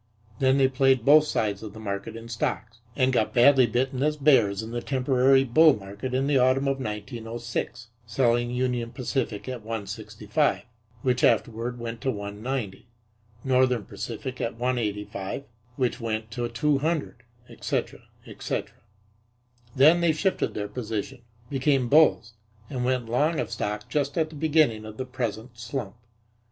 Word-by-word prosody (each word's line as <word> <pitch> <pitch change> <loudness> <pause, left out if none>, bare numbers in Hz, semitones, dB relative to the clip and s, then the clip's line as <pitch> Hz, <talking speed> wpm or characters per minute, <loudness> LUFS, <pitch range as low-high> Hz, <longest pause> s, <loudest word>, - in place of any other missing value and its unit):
Then 130 0 +3
they 135 -1 +5
played 130 -2 +2
both 150 +2 +7
sides 105 -8 -1
of 110 -2 -8
the 110 - -10
market 100 0 -5
in 115 0 -9
stocks 115 0 -3 0.2
and 130 -1 +2
got 115 +1 0
badly 130 +1 +6
bitten 130 +3 -1
as 150 +1 +1
bears 120 -9 +3
in 110 - -7
the 120 0 -3
temporary 135 0 +3
bull 150 +2 +5
market 100 +6 -6
in 135 +1 +1
the 140 -2 +3
autumn 130 +2 +3
of 135 0 0
1906, 115 +1 -5 0.2
selling 120 +1 +1
Union 125 -1 -1
Pacific 125 -5 -3
at 125 -2 -5
165, 105 +4 -2 0.4
which 125 -1 +1
afterward 120 +1 +1
went 115 -1 -6
to 135 - -1
190, 105 +1 -4 0.6
Northern 125 -4 +2
Pacific 125 +5 -6
at 115 - -2
185, 105 -2 -3 0.3
which 125 0 -1
went 110 -1 -3
to 120 +2 -3
200, 150 +2 -1 0.3
etc., - - -3 0.3
etc. - - -5 1.0
Then 155 +6 +6
they 170 -2 +3
shifted 190 +5 -1
their 105 -1 -3
position, 115 +2 -5 0.3
became 135 -2 +1
bulls 130 -6 +4 0.4
and 125 -3 -2
went 125 -2 0
long 150 +8 +1
of - - -3
stock 105 0 -3
just 145 -1 -1
at 160 -1 0
the - - -11
beginning 150 -7 +2
of 110 0 -9
the 130 - -3
present 120 -2 -5
slump. 115 -3 -5
125 Hz, 150 wpm, -26 LUFS, 110-135 Hz, 1.0 s, both